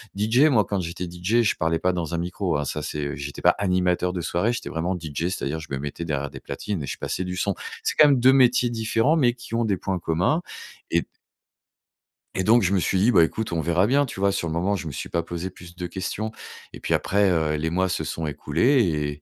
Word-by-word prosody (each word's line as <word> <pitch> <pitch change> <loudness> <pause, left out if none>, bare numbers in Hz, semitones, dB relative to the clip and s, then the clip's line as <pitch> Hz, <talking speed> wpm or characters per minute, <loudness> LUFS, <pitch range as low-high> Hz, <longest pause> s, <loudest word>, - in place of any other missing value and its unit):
DJ, 110 +7 +3
moi, 125 -9 +4
quand 100 -2 -2
j'étais 90 +1 -4
DJ, 90 +7 +1
je 115 - +2
parlais 80 0 0
pas 90 +2 +2
dans 85 -2 -3
un 85 - 0
micro, 85 -2 -2
hein, 75 - -2
ça 75 +2 -3
c'est, 75 0 -3
heu, 70 - -4
j'étais 70 +1 -7
pas - - +5
animateur 90 -2 +1
de 90 - -3
soirée, 90 +8 0
j'étais 120 - -5
vraiment 85 +4 -2
DJ, 80 0 -4
c'est-à-dire 80 -4 -3
je 80 - -9
me 70 - -1
mettais 75 +4 -5
derrière 70 -3 -2
des - - -9
platines 85 +5 -4
et 70 - -5
je - - -4
passais 95 - -3
du 90 0 -4
son. 100 +2 0 0.3
C'est - - 0
quand 150 - +9
même 140 -3 +4
2 130 +2 +6
métiers 125 -2 +4
différents, 115 +5 +1
mais 125 -7 +3
qui 120 -2 -12
ont 115 - +1
des 100 -3 +1
points 95 0 -2
communs 90 - +1 0.5
et - - +3
d - - -12 1.3
et 95 - 0
donc, 115 +2 +5
je 95 +1 +1
me 95 - +3
suis 95 +1 +1
dit: 115 +5 +4
«Bah, 85 - +6
écoute, 110 +7 -2
on 80 - 0
verra 85 +5 +2
bien». 140 +3 +3
Tu 120 - -8
vois 100 0 +3
sur 85 - -2
le 80 - -3
moment, 90 +5 0
je 90 -4 -5
me - - -4
suis - - -5
pas 85 -1 -1
posé 85 +2 -5
plus 85 -1 -14
de 90 -1 -4
questions 105 +4 -4 0.4
et - - -9
puis - - -1
après, 100 0 +2
heu, 80 -2 +1
les 80 +2 -1
mois 95 +3 +1
se - - -1
sont 80 -1 -4
écoulés 75 - +1
90 Hz, 255 wpm, -24 LUFS, 80-110 Hz, 1.3 s, quand